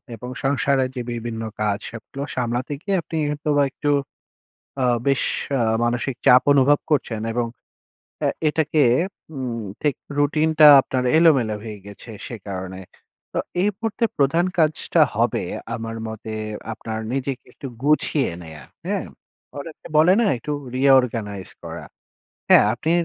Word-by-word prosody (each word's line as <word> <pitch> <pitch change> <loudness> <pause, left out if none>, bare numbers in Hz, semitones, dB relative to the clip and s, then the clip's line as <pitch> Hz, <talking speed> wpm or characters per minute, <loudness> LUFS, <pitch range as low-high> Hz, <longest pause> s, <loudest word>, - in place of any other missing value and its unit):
এবং 125 +3 -8
সংসারের 135 -1 +1
যে 125 - -3
বিভিন্ন 115 -1 -5 0.2
কাজ, 105 -1 +1
সবগুলো 120 +5 -7
সামলাতে 125 +2 -2
গিয়ে 200 +1 -1
আপনি 165 - -8
হয়তোবা 145 -1 +1
একটু 145 - -3 0.9
আ - - +3 0.2
বেশ 135 -1 +2 0.4
আ - - +3 0.2
মানসিক 120 +2 -1
চাপ 125 +1 +8
অনুভব 140 +1 +4
করছেন 125 -7 0
এবং 120 0 0 0.8
এ - - +4 0.2
এটাকে 155 0 +1 0.5
উম 125 -3 -3 0.2
ঠিক 145 -3 +1 0.2
রুটিনটা 155 +1 +4
আপনার 130 -1 -2
এলোমেলো 135 -10 +4
হয়ে 110 -2 -7
গেছে, 100 +3 -12 0.2
সে 120 - -6
কারণে। 95 -1 -5 0.5
তা - - -1 0.2
এই 200 - +3
মুহূর্তে 225 +1 -1
প্রধান 145 +5 +3
কাজটা 155 -2 +2
হবে - - +1 0.3
আমার 115 0 -5
মতে, 110 0 -7 0.4
আপনার 110 0 -5
নিজেকে 135 -1 -3
একটু 140 - -8 0.2
গুছিয়ে 150 -1 +2
নেয়া, 80 -3 -11 0.2
হ্যাঁ? - - -1 0.5
অনেকে 155 +2 -10
বলে 165 +4 +6
না, 235 - +3
একটু 135 +6 -6 0.2
reorganize 120 -8 +2
করা, - - -7 0.6
হ্যাঁ? - - +7
আপনি 155 +7 -3
130 Hz, 135 wpm, -22 LUFS, 115-150 Hz, 0.9 s, চাপ